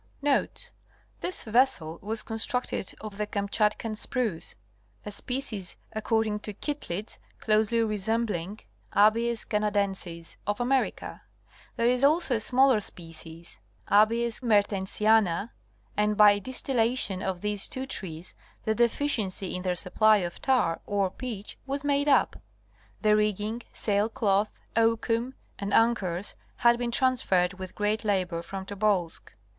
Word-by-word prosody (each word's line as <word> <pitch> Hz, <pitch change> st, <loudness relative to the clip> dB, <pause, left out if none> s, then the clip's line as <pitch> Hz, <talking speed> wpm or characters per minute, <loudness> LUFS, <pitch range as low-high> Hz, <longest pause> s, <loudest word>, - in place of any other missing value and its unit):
Notes.—This 290 Hz, +5 st, -3 dB
vessel 215 Hz, -9 st, +1 dB
was 215 Hz, +2 st, -2 dB
constructed 225 Hz, -2 st, -1 dB
of 210 Hz, -2 st, -8 dB
the 210 Hz, -, -1 dB
Kamchatkan 210 Hz, +2 st, 0 dB
spruce, 220 Hz, -6 st, -1 dB, 0.5 s
a 210 Hz, -, -5 dB
species 220 Hz, -4 st, -3 dB
according 220 Hz, -1 st, 0 dB
to 210 Hz, -1 st, -6 dB
Kittlitz 215 Hz, -, -4 dB, 0.2 s
closely 220 Hz, +1 st, +2 dB
resembling 210 Hz, -3 st, -2 dB, 0.3 s
Abies 230 Hz, +3 st, +3 dB
canadensis 200 Hz, -5 st, -2 dB
of 205 Hz, +2 st, -1 dB
America. 260 Hz, +2 st, -1 dB, 0.5 s
There 230 Hz, -, 0 dB
is 250 Hz, +2 st, +2 dB
alsoa 285 Hz, -6 st, +3 dB
smaller 255 Hz, -1 st, +4 dB
species, 165 Hz, -2 st, -11 dB, 0.3 s
A. 210 Hz, +2 st, +6 dB
mertensiana, 215 Hz, -3 st, +1 dB, 0.4 s
and 210 Hz, 0 st, +1 dB
by 205 Hz, -1 st, +7 dB
dis 255 Hz, +6 st, -5 dB
tillation 230 Hz, -6 st, +1 dB
of 190 Hz, -2 st, -3 dB
these 210 Hz, -1 st, 0 dB
two 260 Hz, 0 st, -4 dB
trees 180 Hz, -9 st, -5 dB, 0.3 s
the 220 Hz, -, +1 dB
deficiency 220 Hz, -6 st, +1 dB
in 180 Hz, -, -3 dB
their 180 Hz, -1 st, -1 dB
supply 215 Hz, +5 st, +4 dB
of 175 Hz, -3 st, -4 dB
tar 250 Hz, -11 st, +1 dB
or 200 Hz, -2 st, 0 dB
pitch 220 Hz, -5 st, -7 dB
was 275 Hz, +1 st, -2 dB
madeup. 285 Hz, 0 st, +2 dB, 0.6 s
The 210 Hz, 0 st, +5 dB
rigging, 210 Hz, +2 st, 0 dB
sail 205 Hz, +1 st, 0 dB
cloth, 205 Hz, -2 st, 0 dB, 0.2 s
oakum 230 Hz, +2 st, +1 dB, 0.2 s
and 200 Hz, 0 st, -3 dB
anchors 205 Hz, -5 st, +2 dB, 0.2 s
had 235 Hz, 0 st, +4 dB
been 240 Hz, -1 st, -1 dB
transferred 200 Hz, -8 st, +1 dB
with 185 Hz, -1 st, -7 dB
great 210 Hz, +2 st, 0 dB
labor 185 Hz, -5 st, 0 dB
from 190 Hz, +2 st, -7 dB
Tobolsk. 200 Hz, -4 st, -1 dB
210 Hz, 120 wpm, -27 LUFS, 195-235 Hz, 0.6 s, by